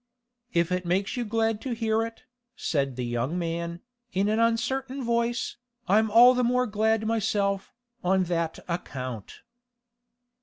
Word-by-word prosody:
'If 170 0 +1
it 180 0 0
makes 185 +3 0
you 245 - -1
glad 225 -1 0
to 255 -3 -3
hear 225 -1 +1
it,' 230 0 -7 0.3
said 135 -4 -1
the 125 0 -3
young 120 +7 -1
man, 170 0 -3 0.3
in 195 +2 +1
an 215 +1 +1
uncertain 255 +4 0
voice, 235 0 0 0.3
'I'm 215 +3 +4
all 240 +4 +8
the 250 0 +1
more 250 +1 +2
glad 220 0 +1
myself, 200 -3 0 0.3
on 190 +1 +3
that 170 -2 -1
account. 130 - -5
210 Hz, 145 wpm, -27 LUFS, 170-230 Hz, 0.3 s, all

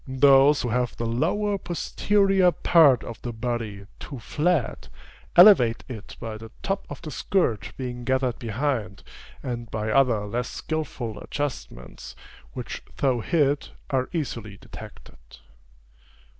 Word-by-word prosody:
Those 135 +2 +5
who 120 - -1
have 125 +1 -1
the 115 - -2
lower 190 - 0
posterior 195 +1 +2
part 150 -6 +5
of 115 - -8
the 120 - -4
body 110 -3 -4
too 140 - -8
flat, 150 +4 -1 0.5
elevate 175 - +7
it 115 -4 -9
by 110 -1 -6
the 115 0 -10
top 195 0 -2
of - - -9
the 155 - -6
skirt 145 - 0
being 125 -2 -5
gathered 130 -1 0
behind, 115 -4 -2 0.4
and 120 -3 -5
by 110 0 -2
other 120 -5 +3
less 120 +4 -3
skilful 130 -8 -4
adjustments, 65 - -6 0.4
which - - -6 0.2
though 130 -4 +1
hid, 145 +1 +1 0.2
are 130 -1 0
easily 115 - -4
detected. - - -12
125 Hz, 130 wpm, -25 LUFS, 115-150 Hz, 0.5 s, elevate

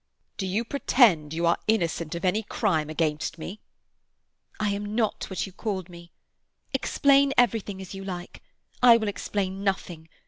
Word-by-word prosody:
"Do 190 - -2
you 210 +6 -1
pretend 225 - +3
you 165 +2 -1
are 170 - +3
innocent 170 -6 0
of 170 - -4
any 185 +4 +2
crime 175 -8 -1
against 155 0 -1
me?" 185 +6 -7 1.0
"I 215 -1 +1
am 205 +1 -4
not 225 -2 -1
what 190 - -2
you 195 - -10
called 190 -3 -4
me. 170 -1 -13 0.6
Explain 280 0 +3
everything 220 -4 +2
as 190 - -9
you 195 0 -7
like. 180 -2 -7 0.4
I 240 -2 +8
will 220 -2 -2
explain 195 0 -3
nothing. 175 -5 -3
195 Hz, 160 wpm, -26 LUFS, 170-215 Hz, 1.0 s, I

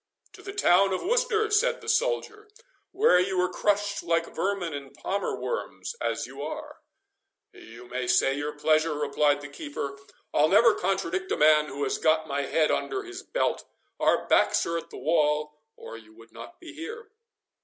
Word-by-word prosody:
"To - - -13
the 390 - -7
town 195 - +3
of 185 - -2
Worcester," 445 0 +1
said 485 +4 +2
the - - -13
soldier, 450 -3 -1 0.4
"where 380 - +4
you 185 +1 0
were 180 0 +1
crushed 205 0 0
like 165 0 -1
vermin 190 -4 -2
and 140 -1 -8
palmer 200 +1 -3
worms, 480 - -4
as - - -1
you - - -10
are." - - -7 0.7
"You 120 +2 -13
may 125 0 -4
say 135 +2 +3
your 145 +1 -3
pleasure," 155 +1 +1
replied 145 0 +1
the 145 - -7
keeper; 145 - -6 0.3
"I'll 150 +1 +4
never 225 +3 +6
contradict 190 -1 -2
a - - +1
man 150 0 +5
who 140 +1 -5
has 135 - -1
got 160 0 +2
my 140 +1 -1
head 155 -1 +2
under 395 -1 -2
his 370 -1 -8
belt. - - -1 0.4
Our - - +2
backs - - +3
are 170 0 -1
at 165 +1 -13
the - - -10
wall, 150 0 0
or 115 - -10
you 110 -1 -17
would 115 0 -17
not 345 - -12
be 335 -3 -11
here." 425 +8 -8
170 Hz, 180 wpm, -27 LUFS, -, 0.7 s, never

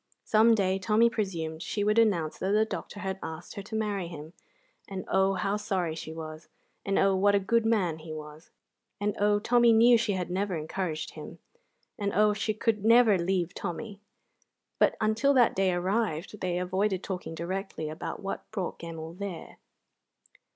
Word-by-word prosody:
Some 225 +1 +5
day, 190 -2 +1
Tommy 215 +5 +3
presumed, 165 -8 -3
she 205 - -2
would 210 +2 +3
announce 175 -9 +1
that 190 +2 0
the 215 +1 +4
doctor 205 -1 -6
had 190 -1 -3
asked 160 +2 -7
her 200 - -6
to 220 +3 -8
marry 205 -4 -1
him; 160 -1 -9 0.5
and 190 -2 -6
oh, 190 0 +2
how 195 +2 0
sorry 190 -6 -1
she 160 0 -7
was; 160 0 -8 0.3
and 195 - 0
oh, 195 0 +4
what 200 +2 +3
a - - +4
good 225 +3 +1
man 185 -8 +1
he 155 0 -9
was; 155 +1 -9 0.5
and 205 0 -1
oh, 205 0 +3
Tommy 235 +2 +4
knew 230 +1 +6
she 215 -3 0
had 180 -2 -3
never 190 0 -1
encouraged 160 +1 -3
him; - - -10 0.6
and 200 -1 -1
oh, 210 0 +4
she 215 +1 -1
could 215 -1 0
never 225 -3 +6
leave 180 0 0
Tommy! 200 +3 -5 0.8
But - - +3
until 225 +6 +2
that 245 -3 +4
day 190 -1 +2
arrived 190 0 -1
they 180 -1 -1
avoided 190 +2 0
talking 180 -3 -5
directly 180 -1 -4
about 155 +5 -6
what 195 - -5
brought 195 -4 -4
Gemmell 165 -1 -7
there. 185 -2 -7
195 Hz, 175 wpm, -28 LUFS, 175-210 Hz, 0.8 s, knew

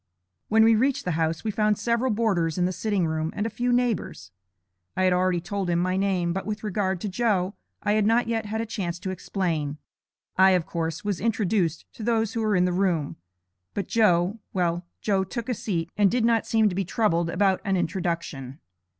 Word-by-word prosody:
When 220 +1 +5
we 225 0 +6
reached 260 +5 +1
the 180 - 0
house, 160 0 -1
we 220 - -1
found 210 0 +1
several 235 +2 0
boarders 200 -8 +1
in 180 - +2
the 185 - 0
sitting 200 -1 0
room 160 0 -1
and 210 +1 -1
a 225 - -2
few 245 +3 -1
neighbors. 240 - -1 0.7
I 185 - +2
had 185 -1 +4
already 180 -1 +2
told 195 +1 -3
him 170 - +2
my 185 +1 +1
name, 190 -3 +1
but 195 - -3
with 215 0 -4
regard 190 -3 -1
to - - -2
Joe, 195 -2 0 0.3
I 205 - +1
had 210 0 +3
not 230 +2 +3
yet 225 -2 -1
had 220 +2 -2
a - - -2
chance 180 -6 -3
to 190 +1 -4
explain. 165 -6 -2 0.6
I, 190 0 +6
of 170 - -3
course, 165 +1 -3
was 200 -4 -1
introduced 200 -7 0
to - - -11
those 225 -1 0
who 230 - -1
were 215 -2 +1
in 180 0 +3
the 180 - 0
room, 175 -6 0 0.6
but 195 - -2
Joe 195 -2 +2
well, 175 -1 0
Joe 195 -3 +1
took 230 +4 -5
a - - +2
seat, 190 -8 -3
and 205 -2 +4
did 240 +1 +1
not 230 -1 +2
seem 220 -1 +3
to 195 - 0
be 195 +2 0
troubled 170 -3 +1
about 190 +2 +2
an 195 -3 +1
introduction. 170 -7 -3
190 Hz, 210 wpm, -25 LUFS, 175-220 Hz, 0.7 s, we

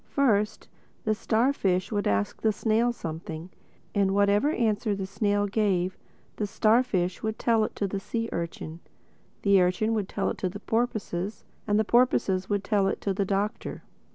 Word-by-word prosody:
First 215 -6 +1 0.4
the 215 - +2
starfish 215 -4 +1
would 205 -1 0
ask 100 0 0
the 220 - +3
snail 225 +3 +1
something; 160 -3 -6 0.4
and 195 -1 +2
whatever 205 +6 +3
answer 220 -6 +1
the 195 -1 -3
snail 205 +1 0
gave, 195 -3 +1 0.4
the 210 - -1
starfish 215 -4 +2
would 220 0 -2
tell 230 -2 +2
it - - -7
to 200 - -1
the 195 +1 -3
sea 230 +3 -3
urchin, 170 -1 -5 0.6
the 200 -2 +5
urchin 185 +5 +1
would 210 -4 -1
tell 200 - -1
it - - -7
to 185 - 0
the 205 +3 -8
porpoises 220 -4 -2 0.2
and 205 0 +3
the 215 - +2
porpoises 200 -6 +2
would 205 -1 0
tell 200 -2 +2
it - - -1
to 200 - 0
the 195 +1 0
Doctor. 200 +2 -2
205 Hz, 170 wpm, -27 LUFS, 190-220 Hz, 0.6 s, the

